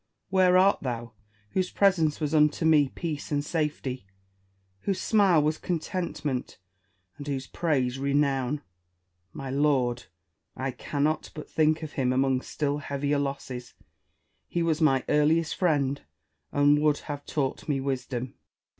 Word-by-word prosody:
where 185 Hz, -1 st, +5 dB
art 195 Hz, +2 st, +4 dB
thou, 120 Hz, -3 st, -4 dB, 0.4 s
whose 185 Hz, -1 st, 0 dB
presence 170 Hz, -7 st, +2 dB
was 150 Hz, -1 st, -2 dB
unto 150 Hz, +1 st, +3 dB
me 150 Hz, -4 st, +5 dB
peace 155 Hz, -2 st, -5 dB
and 145 Hz, 0 st, 0 dB
safety; 145 Hz, -, -2 dB, 0.7 s
whose 190 Hz, -, -2 dB
smile 195 Hz, -7 st, +4 dB
was 155 Hz, +1 st, 0 dB
contentment, 165 Hz, -6 st, -3 dB, 0.6 s
and 145 Hz, -, -7 dB
whose 135 Hz, -2 st, -2 dB
praise 135 Hz, -7 st, 0 dB
renown 140 Hz, -1 st, +1 dB
1 145 Hz, -, -8 dB, 0.7 s
My 135 Hz, -, -6 dB
lord 135 Hz, -4 st, +1 dB, 0.5 s
1 130 Hz, -, -4 dB
I 135 Hz, -, 0 dB
cannot 150 Hz, +4 st, -1 dB
but 150 Hz, -, -7 dB
think 155 Hz, 0 st, +2 dB
of 155 Hz, -, -5 dB
him 130 Hz, -2 st, 0 dB
among 130 Hz, 0 st, +2 dB
still 145 Hz, 0 st, -2 dB
heavier 145 Hz, 0 st, -1 dB
losses; 135 Hz, -3 st, -5 dB, 0.7 s
he 170 Hz, -, -1 dB
was 165 Hz, -1 st, 0 dB
my 135 Hz, -4 st, +3 dB
earliest 155 Hz, +2 st, +2 dB
friend, 145 Hz, -6 st, +1 dB, 0.5 s
and 145 Hz, +1 st, +4 dB
would 150 Hz, -1 st, +3 dB
have 145 Hz, -1 st, -6 dB
taught 140 Hz, 0 st, -2 dB
me 140 Hz, -2 st, +1 dB
wisdom. 130 Hz, -2 st, -3 dB
145 Hz, 140 wpm, -27 LUFS, 135-160 Hz, 0.7 s, where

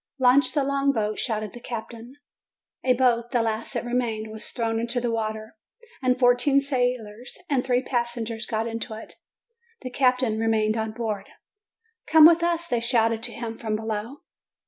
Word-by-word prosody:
"Launch 260 Hz, +1 st, +4 dB
the 290 Hz, -2 st, +1 dB
long 280 Hz, 0 st, +1 dB
boat!" 215 Hz, -4 st, -2 dB
shouted 215 Hz, -4 st, -2 dB
the 240 Hz, -, -9 dB
captain. 235 Hz, +1 st, -8 dB, 0.7 s
A 255 Hz, -, +4 dB
boat, 240 Hz, -2 st, +2 dB
the 240 Hz, -3 st, +1 dB
last 225 Hz, 0 st, -3 dB
that -, -, -2 dB
remained, 230 Hz, -3 st, -2 dB
was 220 Hz, 0 st, -7 dB
thrown 225 Hz, -2 st, -2 dB
into 235 Hz, +2 st, -1 dB
the 240 Hz, -1 st, -1 dB
water, 220 Hz, -1 st, -4 dB, 0.5 s
and 255 Hz, -1 st, +2 dB
fourteen 250 Hz, +2 st, +4 dB
sailors 245 Hz, -4 st, -2 dB
and 260 Hz, -3 st, +2 dB
three 250 Hz, -1 st, +1 dB
passengers 235 Hz, -3 st, -2 dB
got 220 Hz, -1 st, -1 dB
into 230 Hz, -1 st, -5 dB
it. 220 Hz, -, -10 dB, 0.7 s
The 255 Hz, -, -5 dB
captain 250 Hz, -4 st, +2 dB
remained 220 Hz, -1 st, +1 dB
on 220 Hz, -1 st, -2 dB
board. 215 Hz, -4 st, -4 dB, 0.8 s
"Come 315 Hz, 0 st, +8 dB
with 335 Hz, +1 st, +7 dB
us!" 340 Hz, 0 st, 0 dB
they 240 Hz, -5 st, 0 dB
shouted 230 Hz, -2 st, +2 dB
to 240 Hz, 0 st, -2 dB
him 230 Hz, -1 st, -6 dB
from 220 Hz, -2 st, -2 dB
below. 220 Hz, +5 st, -4 dB
235 Hz, 170 wpm, -25 LUFS, 220-255 Hz, 0.8 s, Come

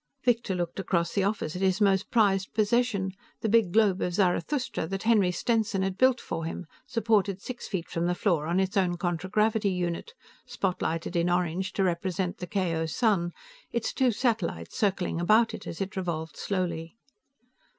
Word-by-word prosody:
Victor 235 Hz, -5 st, +1 dB
looked 175 Hz, +1 st, -3 dB
across 170 Hz, -3 st, 0 dB
the 200 Hz, -, +1 dB
office 200 Hz, -5 st, -1 dB
at 180 Hz, -, -4 dB
his 190 Hz, 0 st, +2 dB
most 195 Hz, -2 st, +2 dB
prized 195 Hz, -4 st, +2 dB
possession, 215 Hz, -2 st, +1 dB, 0.3 s
the -, -, 0 dB
big 220 Hz, -4 st, +3 dB
globe 205 Hz, -2 st, +3 dB
of 175 Hz, -, -1 dB
Zarathustra 195 Hz, -, 0 dB
that 195 Hz, +2 st, -4 dB
Henry 215 Hz, -5 st, +4 dB
Stenson 210 Hz, 0 st, 0 dB
had 190 Hz, -1 st, -1 dB
built 255 Hz, +4 st, +4 dB
for 165 Hz, -, -4 dB
him, 170 Hz, +2 st, -5 dB, 0.2 s
supported 210 Hz, -4 st, +1 dB
six 245 Hz, +4 st, -7 dB
feet 180 Hz, -4 st, -3 dB
from 170 Hz, +1 st, -1 dB
the 180 Hz, -, +1 dB
floor 170 Hz, -6 st, +1 dB
on 175 Hz, +3 st, +1 dB
its 190 Hz, +2 st, 0 dB
own 180 Hz, -3 st, +2 dB
contragravity 200 Hz, +5 st, +1 dB
unit, 180 Hz, -, -3 dB, 0.3 s
spotlighted 175 Hz, -2 st, -2 dB
in 170 Hz, +1 st, +2 dB
orange 180 Hz, +1 st, 0 dB
to 195 Hz, -, +1 dB
represent 180 Hz, 0 st, -1 dB
the 180 Hz, -, -5 dB
KO 170 Hz, -4 st, -1 dB
sun, 190 Hz, -3 st, +1 dB, 0.4 s
its 235 Hz, -1 st, -2 dB
two 260 Hz, -2 st, +3 dB
satellites 205 Hz, -, -1 dB
circling 190 Hz, -4 st, 0 dB
about 220 Hz, +6 st, +4 dB
it -, -, -8 dB
as -, -, -6 dB
it 195 Hz, -1 st, -3 dB
revolved 165 Hz, -4 st, -3 dB
slowly. 170 Hz, -2 st, -3 dB
190 Hz, 170 wpm, -28 LUFS, 175-215 Hz, 0.4 s, Henry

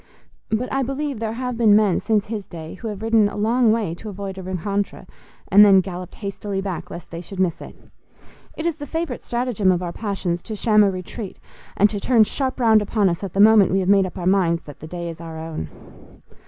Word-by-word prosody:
But 220 Hz, +3 st, -1 dB
I 270 Hz, -, +1 dB
believe 275 Hz, -1 st, -3 dB
there 220 Hz, -1 st, -2 dB
have 250 Hz, 0 st, -4 dB
been 215 Hz, -3 st, +6 dB
men 210 Hz, -4 st, +3 dB
since 215 Hz, -2 st, +1 dB
his 210 Hz, -2 st, -5 dB
day 160 Hz, -1 st, -8 dB
who 225 Hz, -, -7 dB
have 210 Hz, -1 st, -6 dB
ridden 225 Hz, -2 st, +3 dB
a -, -, -8 dB
long 225 Hz, +2 st, +3 dB
way 215 Hz, -7 st, 0 dB
to 215 Hz, +5 st, -8 dB
avoid 195 Hz, -1 st, -6 dB
a -, -, -5 dB
rencontre, 190 Hz, +2 st, -3 dB, 0.5 s
and 205 Hz, +2 st, +9 dB
then 195 Hz, -2 st, +7 dB
galloped 180 Hz, -1 st, -5 dB
hastily 200 Hz, -1 st, -4 dB
back 195 Hz, -3 st, -4 dB
lest 170 Hz, -, -9 dB
they 170 Hz, 0 st, -6 dB
should 190 Hz, +1 st, -9 dB
miss 180 Hz, -3 st, 0 dB
it. -, -, -10 dB, 0.8 s
It 315 Hz, -, -4 dB
is 335 Hz, -2 st, 0 dB
the 290 Hz, -1 st, -7 dB
favourite 325 Hz, -5 st, -3 dB
stratagem 235 Hz, -6 st, 0 dB
of 180 Hz, 0 st, 0 dB
our 170 Hz, -1 st, -4 dB
passions 190 Hz, -5 st, -3 dB
to 220 Hz, -, -6 dB
sham 210 Hz, 0 st, +4 dB
a 200 Hz, -, +4 dB
retreat, 185 Hz, +2 st, -6 dB, 0.4 s
and 205 Hz, -, +6 dB
to 205 Hz, -, -3 dB
turn 230 Hz, +1 st, +4 dB
sharp 260 Hz, +4 st, -2 dB
round 220 Hz, -3 st, +5 dB
upon 205 Hz, -1 st, +1 dB
us 170 Hz, +3 st, -3 dB
at 195 Hz, -, -5 dB
the 195 Hz, -, -2 dB
moment 210 Hz, -2 st, +7 dB
we 195 Hz, -, +3 dB
have 185 Hz, 0 st, -1 dB
made 195 Hz, -2 st, +5 dB
up 185 Hz, -, -10 dB
our 175 Hz, -, -4 dB
minds 180 Hz, -3 st, +2 dB
that 145 Hz, -, -12 dB
the 155 Hz, -, -9 dB
day 170 Hz, +1 st, -5 dB
is 165 Hz, 0 st, -7 dB
our 165 Hz, -1 st, -8 dB
own. 160 Hz, -, -6 dB
200 Hz, 235 wpm, -22 LUFS, 185-225 Hz, 0.8 s, and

